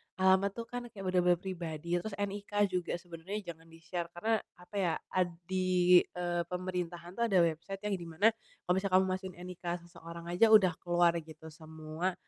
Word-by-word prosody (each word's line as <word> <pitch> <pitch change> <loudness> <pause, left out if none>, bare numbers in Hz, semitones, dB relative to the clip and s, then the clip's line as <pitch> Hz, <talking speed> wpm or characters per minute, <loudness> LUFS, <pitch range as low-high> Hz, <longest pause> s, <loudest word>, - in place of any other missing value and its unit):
alamat 190 +1 +4
tuh 235 - -4
kan 245 0 -5
kayak 205 -4 -10
bener-bener 180 -1 +3
pribadi, 170 -2 -3
terus 200 +3 -5
NIK 205 0 -4 0.2
juga 180 -1 -1
sebenarnya 175 +3 -6
jangan 165 0 -17
di-share 165 +1 -5
karena 220 +5 +1 0.2
apa 180 +3 -15
ya, 180 -4 +2 0.2
ad 185 -1 +2 0.2
di, 180 -1 +5 0.2
eee, 175 -1 -1
pemerintahan 180 -1 -4
tuh 235 - +3
ada 195 -4 +4
website 170 +4 -2
yang 210 -1 0
di 170 - -7
mana 185 +8 +4 0.3
kalau 180 +1 +2
kamu 190 -1 +3
masukin 185 0 -4
NIK 180 0 -9 0.3
seseorang 170 -1 -10
aja 180 +6 +5
udah 195 -4 +7
keluar 175 -1 +3
gitu 160 0 -11
semua, 160 +3 -4
180 Hz, 170 wpm, -32 LUFS, 170-190 Hz, 0.3 s, udah